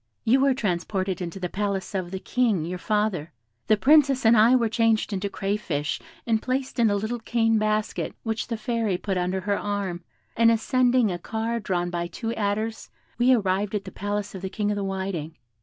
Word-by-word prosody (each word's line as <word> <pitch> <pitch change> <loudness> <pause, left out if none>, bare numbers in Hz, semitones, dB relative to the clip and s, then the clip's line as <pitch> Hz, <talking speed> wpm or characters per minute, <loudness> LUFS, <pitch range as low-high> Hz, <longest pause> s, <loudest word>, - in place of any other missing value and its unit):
You 250 +4 +4
were 270 -1 +3
transported 190 -3 -1
into 175 +2 -5
the 180 - -2
palace 200 0 -3
of 185 -3 -2
the 190 - -4
King, 210 -5 0
your 180 +2 -4
father; 210 -6 -1 0.4
the 215 - +4
Princess 275 0 +4
and 225 +1 +7
I 225 +4 +6
were 235 -3 +3
changed 225 -1 +1
into 200 +1 -2
crayfish, 195 -8 -2 0.2
and 225 -2 +1
placed 260 0 -2
in 230 -2 +5
a 205 - +1
little 220 +4 -2
cane 225 -1 +1
basket, 215 0 -1
which 225 -1 -2
the 230 - -3
Fairy 220 -3 -1
put 195 +1 -3
under 180 +1 -1
her 200 +1 0
arm, 200 -4 -3 0.3
and 230 0 +5
ascending 245 0 +3
a 175 - -4
car 225 +4 -2
drawn 175 -4 -1
by 175 -1 -2
two 225 +6 -4
adders, 215 +1 -2 0.3
we 245 +2 +5
arrived 205 -2 +1
at 200 - -2
the - - -7
palace 205 0 -3
of 190 - -7
the 190 - -4
King 210 +1 -1
of - - 0
the 200 - -2
Whiting. 190 -5 -4
210 Hz, 200 wpm, -25 LUFS, 190-230 Hz, 0.4 s, and